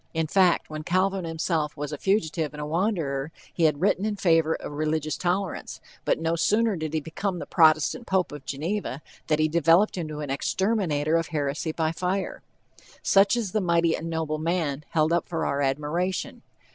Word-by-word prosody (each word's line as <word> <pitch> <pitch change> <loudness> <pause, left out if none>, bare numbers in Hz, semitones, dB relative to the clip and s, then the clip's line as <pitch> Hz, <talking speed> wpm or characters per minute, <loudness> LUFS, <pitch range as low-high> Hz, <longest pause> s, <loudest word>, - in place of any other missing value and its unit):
In 160 0 +1
fact, 180 +1 +3
when 155 0 -6
Calvin 185 +3 0
himself 160 -2 -1
was 145 +1 -4
a - - -3
fugitive 160 -6 0
and - - -8
a - - -3
wanderer, 160 -5 -1 0.2
he 170 - +2
had 150 -1 +2
written 195 0 +2
in 215 -1 -1
favor 165 -4 +3
of - - -7
religious 155 +1 -1
tolerance, 185 +1 -2 0.3
but - - +2
no 165 +1 0
sooner 210 +6 +2
did 160 -2 -4
he - - +2
become 180 +5 -3
the - - -5
Protestant 160 +8 +3
pope 190 -1 +1
of 145 -2 -8
Geneva, 150 +1 -3 0.2
than 155 - +2
he 155 0 +3
developed 170 +6 +3
into 155 -3 -5
an 145 -2 -4
exterminator 165 -2 +1
of 165 -1 -1
heresy 150 +1 -2
by 160 0 0
fire. 185 +3 -2 0.6
Such 195 +4 +4
is 220 -6 -2
the 215 - 0
"mighty 170 -2 +2
and 165 - -5
noble 160 -2 -2
man" 155 -3 -1
held 155 0 +2
up 170 - +1
for 165 - -2
our 140 +1 0
admiration. 150 +7 -1
165 Hz, 185 wpm, -26 LUFS, 155-185 Hz, 0.6 s, Such